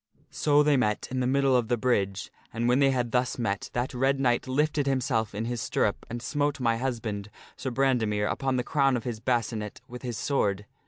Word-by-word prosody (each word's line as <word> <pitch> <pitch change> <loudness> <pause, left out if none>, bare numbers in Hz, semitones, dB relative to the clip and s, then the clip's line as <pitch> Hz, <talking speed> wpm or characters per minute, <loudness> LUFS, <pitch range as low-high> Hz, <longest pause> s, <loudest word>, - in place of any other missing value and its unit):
So 150 0 +3
they 145 -1 +4
met 105 -5 0
in 130 - -1
the 125 - +1
middle 135 0 +3
of 120 -3 +2
the 120 0 +1
bridge, 100 -5 0 0.2
and 115 +1 -1
when 125 +2 +4
they 140 -1 +5
had 125 -3 0
thus 125 +1 0
met 100 -5 -2
that 120 +2 -2
Red 135 +2 +1
Knight 125 -1 +1
lifted 145 +2 +1
himself 125 -6 0
in 110 +2 -2
his 120 -1 -3
stirrup - - -1
and 120 +1 -5
smote 145 +1 -1
my 115 -2 +1
husband, 115 -5 -3 0.3
Sir 135 - -4
Brandemere, 120 -5 +1
upon 135 +4 -1
the 125 - 0
crown 135 -1 +2
of 115 - -6
his 120 -3 -4
bascinet 115 -3 -2
with 125 0 -9
his 120 -3 -4
sword. 105 -7 0
125 Hz, 210 wpm, -27 LUFS, 115-135 Hz, 0.3 s, they